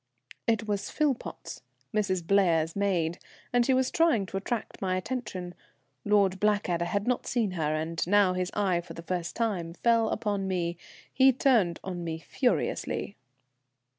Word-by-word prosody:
It 220 -2 +1
was 205 -1 -2
Philpotts, 290 -5 -2 0.3
"Mrs. 190 -5 0
Blair's" 165 -4 +3
maid, 180 -5 0 0.3
and 245 0 +4
she 265 - +2
was 260 0 +1
trying 325 -12 +3
to 190 - -5
attract 220 +3 -4
my 185 -1 0
attention. 185 -4 -4 0.5
Lord 200 -2 +3
Blackadder 205 -5 +1
had 200 +4 -1
not 250 -1 0
seen 230 -5 0
her, 155 -4 -1
and 160 +2 -2
now 200 -1 +4
his 180 0 -1
eye, 190 -4 +1
for 170 -1 -11
the 165 - -8
first 175 -1 -3
time, 190 -8 -1
fell 230 +1 +3
upon 205 -3 -1
me. 175 -2 -1 0.4
He 265 0 +6
turned 235 - +2
on 180 -2 -5
me 165 -1 -3
furiously. 210 - -1
195 Hz, 155 wpm, -28 LUFS, 175-220 Hz, 0.5 s, He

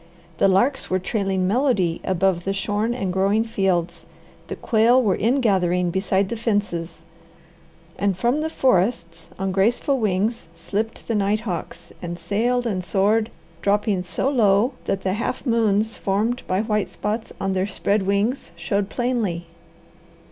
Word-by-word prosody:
The - - +5
larks 240 +9 +2
were 185 - +2
trailing 190 -1 -1
melody 200 -7 +1
above 185 -1 +1
the 195 - -1
shorn 210 +4 -1
and 190 -7 -2
growing 200 +4 +2
fields, 190 -6 -1 0.4
the - - -5
quail 235 +2 +3
were 205 -7 +2
ingathering 190 -8 +1
beside 190 +1 0
the - - -2
fences, 205 -7 -2 1.0
and 200 -2 +1
from 245 +8 +1
the 320 - -1
forests 190 - 0
on 195 0 -2
graceful 235 +8 +1
wings 210 0 0
slipped 210 +6 -4
the 230 - -1
nighthawks 205 -2 -2
and 175 -1 -5
sailed 230 +8 0
and 190 -5 -1
soared, 210 +4 +2 0.3
dropping 205 -1 +1
so 180 +8 -2
low 230 -2 +3
that 195 - -2
the 185 - 0
half 235 +6 -3
moons 225 -2 +1
formed 215 +6 0
by 185 +2 +1
white 210 -2 0
spots 220 +2 -4
on 195 0 -1
their 190 +1 0
spread 205 +1 0
wings 200 +4 0
showed 195 +4 -1
plainly. 225 -10 -1
200 Hz, 145 wpm, -22 LUFS, 190-230 Hz, 1.0 s, The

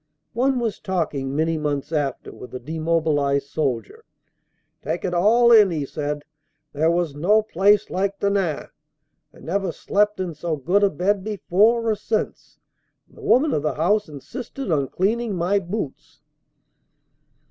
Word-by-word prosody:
One 260 +3 +1
was 230 -4 -2
talking 150 -7 -2
many 160 +1 0
months 145 0 -2
after 145 -4 -2
with 125 - -11
a - - -4
demobilized 155 -1 0
soldier. 145 - -3 0.8
"Take - - -3
it 180 - -2
all 230 +7 +4
in 215 -3 +8
all," - - -4
he 150 -3 -2
said, 145 0 -4 0.5
"there 155 +3 +2
was 170 -3 0
no 200 +9 +3
place 205 +1 +3
like 195 +1 -1
Denain. 195 -6 0 0.7
I - - -18
never 190 +1 -1
slept 210 +4 0
in 180 -3 -3
so 160 +1 -3
good 175 +8 +1
a 200 - +4
bed 190 +4 0
before 215 +3 +2
or 220 - +3
since, 215 +1 -3 0.5
and - - -25
the - - -14
woman 300 - +3
of - - +1
the 150 - -1
house 200 +5 +1
insisted 230 - -7
on 140 -4 +1
cleaning 215 - -1
my 180 +4 +1
boots!" 180 -6 -6
180 Hz, 155 wpm, -23 LUFS, 150-210 Hz, 0.8 s, in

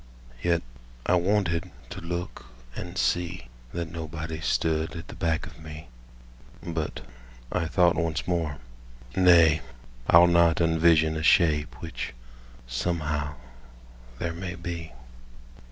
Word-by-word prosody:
Yet 85 -1 +1 0.4
I - - +2
wanted 90 -1 +1 0.2
to - - -6
look 85 -5 -5 0.3
and 90 +1 -6
see 90 -1 0 0.2
That 85 -2 -4
nobody 80 -1 -5
stood 80 +1 0
at 85 +1 -8
the - - -8
back 80 -1 0
of - - -13
me; 75 -3 -9 0.7
But 80 -3 -3 0.5
I 80 - 0
thought 85 0 +4
once 80 -5 -1
more: 80 -5 -1 0.6
"Nay, 85 -4 +6 0.5
I'll 85 +1 +8
not 85 -1 +5
unvision 80 -1 +4
A - - -2
shape 75 -2 +3
which, - - -5 0.5
somehow, 75 +3 -2 0.8
there 85 +5 -2
may 90 +1 -5
be." 85 -2 -6
85 Hz, 120 wpm, -27 LUFS, 80-85 Hz, 0.8 s, I'll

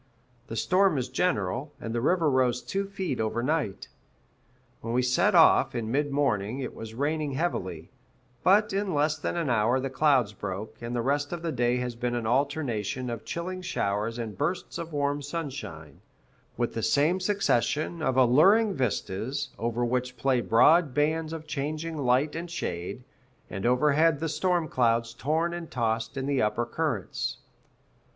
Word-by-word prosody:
The 115 - -6
storm 185 - +3
is 125 -1 -2
general, 130 - -1
and 115 - -5
the 120 - -1
river 165 +4 +2
rose 125 -2 +2
two 195 +1 -2
feet 190 -9 -3
over 110 +2 -1
night. 145 -7 -1 0.9
When 115 - -4
we 125 - +3
set 125 0 +2
off, - - +5
in 115 -2 -2
mid 145 +3 +1
morning, 125 -6 0
it 130 - -4
was 110 0 -9
raining 145 +2 -1
heavily; 95 - -3 0.5
but 205 +2 +4
in 195 -3 -1
less 150 +1 +2
than 160 - -2
an 165 -3 -1
hour 120 +3 +2
the 135 0 -3
clouds 135 -7 +3
broke, 100 +1 -6
and 120 +1 -4
the 120 - 0
rest 145 +2 0
of 170 -1 -5
the 165 - -1
day 120 -3 +1
has 125 -1 -2
been 120 +1 -2
an 120 -2 -2
alternation 125 -3 -1
of 115 -2 -6
chilling 185 +2 -4
showers 110 - -2
and 115 -3 -6
bursts 165 +6 -2
of 170 0 -6
warm 145 -1 -1
sunshine, 135 - -6 0.6
with 120 0 -1
the 115 - -3
same 155 +10 +2
succession, 170 - 0
of 130 -4 0
alluring 190 - +5
vistas, 130 - -2
over 120 +1 -1
which 125 +1 -2
play 130 +1 +2
broad 145 +6 +4
bands 155 +2 +1
of 160 -1 -6
changing 155 +2 -3
light 140 +1 +1
and 170 +1 -5
shade, 120 - -4 0.5
and 95 +3 -2
overhead 150 +4 +3
the 165 +1 -2
storm 175 0 0
clouds 115 -3 +1
torn 160 +7 0
and 175 -2 -6
tossed 115 +1 -1
in 135 - -2
the 140 -2 +1
upper 105 +3 0
currents. 120 - -2
135 Hz, 170 wpm, -27 LUFS, 120-160 Hz, 0.9 s, off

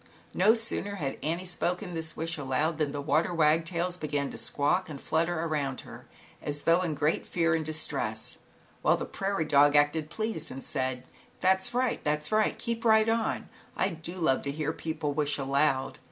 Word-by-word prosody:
No 210 +5 +5
sooner 220 -3 -2
had 140 -8 -3
Annie 170 +4 -2
spoken 180 +1 -1
this 160 -1 -4
wish 165 +1 -1
aloud, 150 +3 -1
than 150 -2 +1
the 145 0 -4
water 155 +5 +2
wagtails 165 +3 +2
began 145 -3 -2
to - - -8
squawk 170 +6 0
and 145 -3 -7
flutter 165 +3 0
around 145 -5 -1
her - - -12 0.3
as 145 0 -3
though 170 +2 +4
in 165 -4 -1
great 150 +2 +1
fear 165 -1 +1
and 160 0 +1
distress, 155 0 -2 0.4
while - - +4
the - - -4
prairie 195 -4 -2
dog 145 0 +5
acted 150 +1 +3
pleased 215 -4 -3
and 135 - -7
said: 130 -2 -2 0.2
" - - -30
That's 190 +4 +2
right, 250 -1 +1
that's 150 +2 -1
right, 215 0 +2
keep 230 -1 -3
right 220 -1 +5
on, 225 0 0 0.3
I 190 - +2
do 165 0 -6
love 160 -7 +2
to 140 - -3
hear 155 +1 -2
people 155 -3 -3
wish 145 -1 +1
aloud. 135 -1 +1
160 Hz, 185 wpm, -29 LUFS, 145-180 Hz, 0.4 s, No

